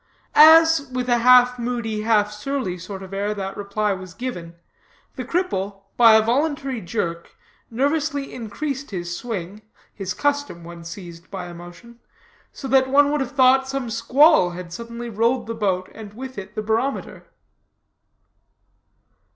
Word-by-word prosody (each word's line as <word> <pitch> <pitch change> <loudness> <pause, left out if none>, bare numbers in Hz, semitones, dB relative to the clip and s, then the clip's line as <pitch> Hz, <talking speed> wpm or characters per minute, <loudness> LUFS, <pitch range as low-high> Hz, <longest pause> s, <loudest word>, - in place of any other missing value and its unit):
As, 320 -1 +7
with 250 -1 -3
a 240 0 +3
half 250 +1 +5
moody, 235 -3 -3
half 210 -2 +2
surly 210 -4 -4
sort 190 +2 -8
of 190 0 -11
air 205 +2 -2
that 195 -1 -5
reply 205 +1 -1
was 185 -1 -9
given, 175 -10 -6 0.6
the 255 - -5
cripple, 205 - -2
by 230 -2 +7
a 220 - +5
voluntary 270 0 -1
jerk, 170 -2 -4 0.3
nervously 285 +3 -1
increased 270 +5 -5
his 175 -3 -5
swing 205 -2 -6 0.3
(his 190 -3 -5
custom 285 -11 -1
when 170 0 -10
seized 170 0 -10
by 185 -2 -6
emotion), 175 +7 -12 0.5
so 270 - -8
that 265 0 +3
one 285 +1 +4
would 295 -1 0
have 265 +1 -4
thought 265 0 +4
some 265 -3 -4
squall 250 - +4
had 175 -2 -8
suddenly 235 +2 -7
rolled 230 +3 0
the 230 - -4
boat 190 -4 -1
and 210 -2 -11
with 260 +2 -8
it 195 +2 -11
the 215 - -3
barometer. 225 +6 -2
230 Hz, 150 wpm, -22 LUFS, 195-265 Hz, 0.6 s, As